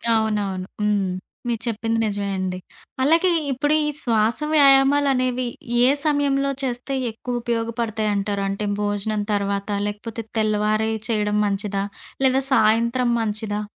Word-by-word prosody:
అవునవును. 205 -4 -1 0.2
హ్మ్. 205 -2 +1 0.4
మీరు 230 -2 -2
చెప్పింది 225 0 -1
నిజమే 205 -1 -2
అండి. 185 -1 -3 0.5
అలాగే 330 +6 +4 0.2
ఇప్పుడు 290 +3 0
ఈ - - 0
శ్వాస 225 -1 +1
వ్యాయామాలనేవి, 270 -3 +4 0.4
ఏ 250 - +6 0.2
సమయంలో 280 -2 +1
చేస్తే 250 +1 -3 0.2
ఎక్కువ 240 +2 -5
ఉపయోగపడతాయంటారు? 220 -3 -2
అంటే 200 +2 -3 0.2
భోజనం 205 +1 -1
తర్వాతా? 200 0 -1
లేకపోతే 225 +2 -6
తెల్లవారే 215 0 +1 0.2
చేయడం 210 -2 0
మంచిదా? 200 0 -2 0.4
లేదా 265 +1 +3
సాయంత్రం 235 +2 +2
మంచిదా? 210 -1 -2
220 Hz, 115 wpm, -22 LUFS, 205-250 Hz, 0.5 s, ఏ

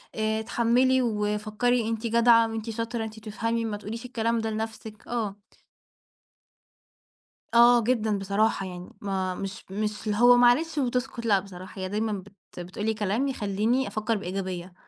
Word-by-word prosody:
آآ 220 0 0
"اتحمّلي 245 +4 +2
وفكّري 215 +1 0
أنتِ 230 +1 -2
جدعة 230 0 +5
وأنتِ 225 0 -4
شاطرة، 230 +1 -3
أنتِ 220 0 -7
بتفهمي 230 +2 -2
ما 215 -2 -3
تقوليش 225 +3 -7
الكلام 230 -2 0
ده 225 0 -2
لنَفْسِك." 220 0 -6
آه. 220 -5 -2 2.2
آه، 235 0 +7
جدًا 225 -2 +1
بصراحة 200 +1 +1
يعني 180 -1 -8
ما 190 -2 -2
مش 195 0 -6
مش 210 +1 -3
اللي 205 - 0
هو 245 +1 +7
معلش 265 +7 +4
وبتسكت 250 -2 -1
لأ 205 -3 +4
بصراحة 190 0 -10
هي 185 - -3
دايمًا 215 +2 -1
بت 195 -2 -10
بتقول 185 +4 -5
لي 220 - +2
كلام 215 +5 0
يخلّيني 230 +1 0
أفكّر 215 +1 -1
بإيجابية. 185 -2 -5
220 Hz, 150 wpm, -26 LUFS, 205-235 Hz, 2.2 s, آه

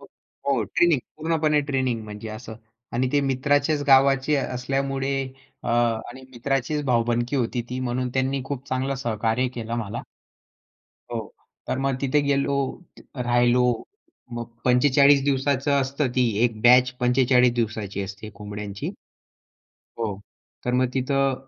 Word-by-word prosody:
हो, 135 -5 -4
ट्रेनिंग 170 -4 +5 0.2
पूर्णपणे 155 -1 +1
ट्रेनिंग 130 -4 0
म्हणजे 105 +1 -8
असं 110 +1 -8 0.4
आणि 125 +1 +1
ते 145 - +4
मित्राचेच 145 +2 +1
गावाचे 135 +1 +5
असल्यामुळे 135 +1 -1 0.5
अ, - - -5
आणि 120 +2 0
मित्राचीच 135 +4 -1
भाऊबंदकी 120 +1 +1
होती 120 -1 -1
ती 125 - -4
म्हणून 125 0 -1
त्यांनी 130 +1 0
खूप 135 -1 -5
चांगलं 130 +1 -1
सहकार्य 115 +2 0
केलं 115 -1 -4
मला. 110 -3 -4 1.1
हो, - - -1 0.5
तर - - -1
मग 135 -1 0
तिथे 140 +2 +2
गेलो, 140 0 +1 0.6
राहिलो. 120 0 +3 0.7
मग 120 0 -4 0.2
45 140 +2 +5
दिवसाचं 140 0 +1
असतं, 135 +1 -1
ती 125 -2 +3 0.2
एक 115 -3 -1
बॅच 125 +1 +6
45 125 0 +4
दिवसाची 110 -4 -2
असते 100 +3 -8
कोंबड्यांची. 105 -1 -6 1.1
हो. 105 -4 -3 0.4
तर 125 - 0
मग 130 0 +3
तिथं 135 0 +1
130 Hz, 125 wpm, -24 LUFS, 120-135 Hz, 1.1 s, बॅच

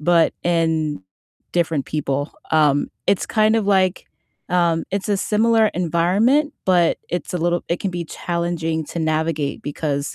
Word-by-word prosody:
but 165 +1 +3
in 160 - 0 0.5
different 165 -5 0
people, 145 -1 -2 0.2
um, 150 -2 +3 0.2
it's 195 - +2
kind 215 0 +3
of, 220 -3 0
like 190 -2 +2 0.5
um, 170 -2 +2
it's 200 +1 -2
a 200 - +2
similar 220 +2 +3
environment, 190 - +2
but 175 -3 +3
it's 175 +1 -4
a - - 0
little 175 +1 0
it 170 - -1
can 195 - -1
be 175 -1 -4
challenging 170 -1 -2
to 170 - -6
navigate 155 -2 -1
because 145 -1 -3
170 Hz, 150 wpm, -21 LUFS, 160-185 Hz, 0.5 s, but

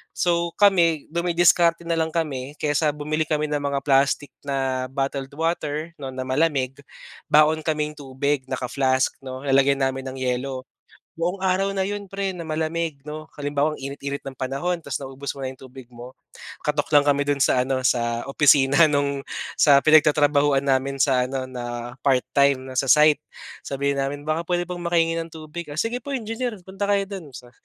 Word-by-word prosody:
So 170 -1 +1
kami, 170 -7 +4
dumidiskarte 170 0 +3
na 170 - +1
lang 160 0 0
kami, 145 -4 -3
kaysa 150 0 +1
bumili 155 +1 -1
kami 155 0 0
ng 150 - 0
mga 140 -1 -1
plastic 140 +1 +2
na, 135 -2 -1
bottled 135 0 -2
water, 160 0 -2
'no, 135 -2 -5
na 130 - -3
malamig, 135 -2 0 0.5
baon 155 +1 +5
kaming 150 -1 -1
tubig 140 0 -2
naka-flask, 130 +1 0
'no? 130 0 -7
Lalagyan 135 0 +3
namin 135 0 -2
ng 130 - -9
yelo. 130 +1 -2 0.6
Buong 180 +3 -1
araw 190 +1 +1
na 190 - +1
'yon 205 0 -5
pre, 195 -1 -2
na 170 - -6
malamig, 160 -2 -2
no? 155 +1 -7
Halimbawa 145 +1 0
ang - - -14
init-init 140 0 -5
ng 135 - -6
panahon, 140 +8 -2
tas 140 -3 -5
naubos 135 +1 -6
mo 135 - -7
na 130 - -3
'yong 130 - -15
tubig 130 -1 -12
mo, 120 +2 -11 0.5
katok 150 -1 0
lang 145 - +7
kami 145 0 +3
do'n 145 -1 +1
sa 125 - +3
ano, 130 -1 0
sa 120 -2 +1
opisina 140 +1 +5
nung, 140 -1 0 0.4
sa 140 -2 +7
pinagtatrabahuhan 145 -2 +4
namin 135 0 +1
sa 130 -3 +3
ano 135 0 -3
na, 120 -1 -5
part-time, 140 0 +2
na 130 0 -9
sa 135 - -1
site, 150 +2 +6 0.4
sabihin 140 0 -1
namin, 140 +1 -3
"Baka 155 +2 -1
puwede 175 -1 +1
bang 180 -1 -5
makahingi 165 -1 +2
ng 165 - -4
tubig", 160 +1 -8
"Oh, 145 - -7
sige 230 +5 -1
po 280 +4 -8
engineer, 225 0 -3
punta 195 +1 -4
kayo 200 -1 +3
do'n", 190 -5 -7
sa 120 -1 -12
145 Hz, 180 wpm, -23 LUFS, 135-165 Hz, 0.6 s, lang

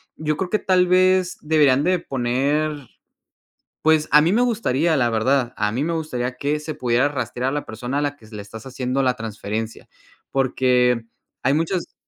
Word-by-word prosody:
yo 155 -1 -2
creo 185 -2 -3
que 215 - +1
tal 180 -1 +2
vez 185 0 +3
deberían 145 -3 +3
de 180 +1 +2
poner 140 +2 -1 1.0
pues, 155 -1 +3
a 150 +1 +7
mí 165 - +2
me 235 +5 +3
gustaría, 170 - +1
la 120 -4 +2
verdad, 120 +2 +1
a 105 0 0
mí 125 +6 -1
me 170 +2 -1
gustaría 130 -6 -3
que 150 +2 -1
se 155 0 -6
pudiera 125 +2 +1
rastrear 130 -2 -3
a - - -3
la 145 0 -3
persona 120 +5 -4
a - - +1
la 145 0 -2
que 115 - -19
s 110 0 -12
le 105 - -6
estás 110 +4 -10
haciendo 130 +1 -2
la 125 -2 +1
transferencia, 110 0 -5 0.4
porque 125 -2 +2 0.4
hay 135 +3 +2
muchas 165 +3 -2
135 Hz, 190 wpm, -22 LUFS, 125-155 Hz, 1.0 s, a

